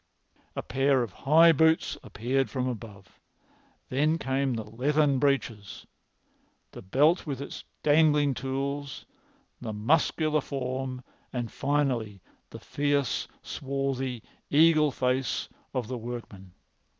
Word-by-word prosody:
A - - -3
pair 135 -1 +2
of 110 -6 -6 0.2
high 165 +2 +8
boots 160 0 +3
appeared 130 +4 -1
from 130 -2 -2
above. 105 - -8 0.7
Then 150 +5 +2
came 135 -3 0
the 110 - -3
leathern 140 +5 +1
breeches, 125 -8 -1 0.9
the - - -10
belt 150 - +2
with 135 -3 -3
its 140 - -7 0.2
dangling 150 -2 +4
tools, 135 +3 -4 0.6
the 110 -3 -4
muscular 155 +6 +2
form, 130 -1 -4 0.3
and, 120 -3 -3
finally, 130 -8 -1 0.3
the - - -9
fierce, 145 -3 -1 0.2
swarthy, 135 -3 -3 0.3
eagle 155 0 +5
face 130 -1 -1 0.2
of 125 -4 -2
the 125 0 -4
workman. 110 -6 -8
135 Hz, 115 wpm, -28 LUFS, 120-145 Hz, 0.9 s, high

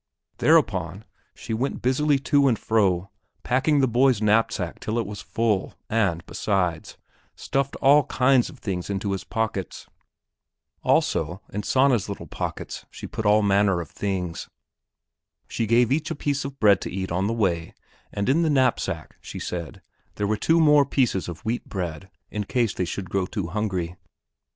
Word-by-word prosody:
Thereupon - - +2 0.3
she - - -6
went 125 +5 -2
busily 140 +3 +2
to 140 +1 +3
and 120 -4 +2
fro 100 -4 +1 0.3
packing 140 +3 +2
the 130 - +3
boy's 125 0 +3
knapsack 105 -4 +1
till 110 +2 -3
it 115 - 0
was 105 +1 -7
full 110 -4 -1 0.2
and, 95 -6 +1
besides, 90 -5 -2 0.4
stuffed 135 0 -2
all 145 +1 +5
kinds 130 -1 +3
of - - -13
things 90 -3 -4
into 100 0 -2
his 95 - -3
pockets. 110 -5 -3 1.0
Also 90 - +1
in 105 - -2
Sanna's 130 -1 +2
little - - -6
pockets - - -5
she - - -9
put 110 - -3
all 105 +1 +5
manner 100 -2 +3
of 85 -4 -7
things. 90 -4 -3 1.0
She 115 - -2
gave 115 +2 +3
each 155 +3 0
a 165 - -3
piece 145 -1 -2
of 140 0 -7
bread 100 -3 +5
to - - -5
eat 95 0 -4
on 95 +3 0
the 115 - 0
way 90 -7 -1 0.4
and 100 0 -2
in 145 +6 +3
the 165 - +2
knapsack, 130 -4 0
she - - -8
said, 85 -4 -6 0.3
there 105 - -1
were 105 +2 +1
two 165 +10 +2
more 150 -2 +6
pieces 115 - 0
of 85 - -9
wheat 115 +2 -2
bread, 90 -1 -5 0.2
in 105 -1 -3
case 120 -3 0
they 90 - -1
should 95 +3 -5
grow 95 -2 0
too 95 -5 -4
hungry. 95 -3 -2
105 Hz, 170 wpm, -24 LUFS, 95-130 Hz, 1.0 s, more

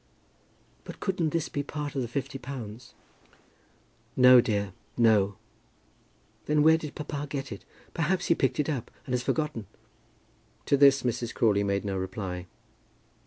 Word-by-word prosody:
"But - - -10
couldn't 180 -5 0
this 165 0 -1
be 145 - -3
part 145 +1 -5
of 135 - -1
the 120 - -2
fifty 135 +3 -4
pounds?" 125 -3 -8 1.2
"No, 125 -1 +8
dear, 100 -5 -2 0.2
no." 105 -4 +4 1.1
"Then 150 0 +3
where 160 +1 +6
did 150 -2 -7
papa 145 -1 -5
get 135 -2 -4
it? 100 - -8 0.3
Perhaps 175 +2 0
he - - +4
picked 135 -4 0
it 150 - +1
up, 140 -7 -3 0.2
and 130 - -4
has 125 - +1
forgotten?" 145 - -2 1.0
To - - +3
this 140 -1 +5
Mrs. 120 -1 -2
Crawley 105 -3 +3
made 100 0 -1
no 100 -1 -2
reply. 95 -1 -5
130 Hz, 150 wpm, -28 LUFS, 110-150 Hz, 1.2 s, No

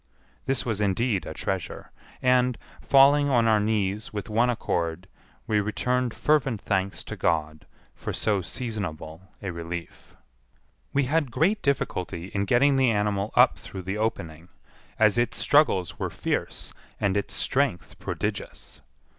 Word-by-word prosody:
This 135 -1 0
was 110 -4 -1
indeed 105 +1 0
a - - -5
treasure; 95 -3 -4 0.3
and, 125 -1 +3 0.2
falling 140 +1 +5
on 120 -4 +3
our 110 -1 +4
knees 105 -1 -1
with 105 -1 -5
one 120 +3 +3
accord, 85 -6 -2 0.4
we 105 -1 +2
returned 125 +3 -1
fervent 135 -7 +1
thanks 95 -1 -1
to - - -7
God 80 -1 -1 0.3
for - - -5
so 105 -3 0
seasonable 90 -6 -5 0.2
a 95 - -2
relief. 85 0 -7 0.8
We 140 - +2
had 145 +1 +1
great 165 - +1
difficulty 95 -9 -2
in 100 0 -1
getting 135 +6 +4
the 130 -2 +4
animal 105 -1 0
up - - +5
through 95 - -8
the 95 +3 -3
opening, 85 -6 -3 0.5
as 110 +1 +4
its 120 -1 0
struggles 120 - +2
were - - -1
fierce - - -3 0.3
and 100 -1 +1
its 100 -3 -1
strength 90 - -1
prodigious. - - -5
105 Hz, 140 wpm, -26 LUFS, 95-125 Hz, 0.8 s, falling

